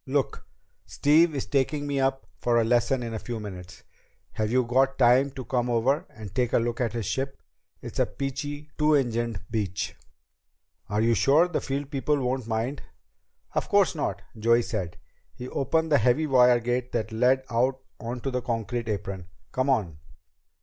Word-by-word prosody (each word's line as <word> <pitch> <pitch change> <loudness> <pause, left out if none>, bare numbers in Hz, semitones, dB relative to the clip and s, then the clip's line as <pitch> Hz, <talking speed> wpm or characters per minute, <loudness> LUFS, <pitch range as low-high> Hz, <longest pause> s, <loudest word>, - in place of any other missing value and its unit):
"Look, 135 0 -1 0.4
Steve 155 +2 +3
is 135 - -2
taking 145 +1 0
me 140 -1 -1
up 135 0 0
for 120 -1 +2
a - - +3
lesson 120 +2 +2
in 115 -1 -5
a 110 - -3
few 120 0 -5
minutes. 95 -4 -9 0.5
Have 110 -1 -1
you 125 +1 +3
got 130 +3 +2
time 125 +2 +5
to 130 -2 -7
come 125 +1 0
over 135 +9 +1
and 105 -4 -10
take 125 0 0
a - - +5
look 120 +1 -1
at 115 -3 0
his 115 -3 -3
ship? 135 +6 -3 0.4
It's - - -6
a - - +3
peachy 145 +2 -5
two 150 0 +4
engined 120 -6 0
Beech." 100 -5 -2 0.9
"Are 105 +1 +1
you 115 +1 +3
sure 145 +8 +4
the 175 - -2
field 140 +1 -3
people 145 +1 0
won't 130 -2 -2
mind?" 115 +5 -2 0.7
"Of - - -1
course - - +4
not," - - -3
Joey 115 +2 +3
said. 90 -8 -4 0.4
He 125 - -7
opened 160 +5 0
the 145 - +6
heavy 125 +7 +3
wire 125 -3 +5
gate 125 +1 -2
that 110 -1 -1
led 125 +4 +3
out 130 +3 +1 0.2
onto 120 +3 -4
the 125 0 -1
concrete 115 0 -3
apron. 95 -3 -4 0.2
"Come 130 +2 0
on." 95 - 0
125 Hz, 175 wpm, -26 LUFS, 115-135 Hz, 0.9 s, the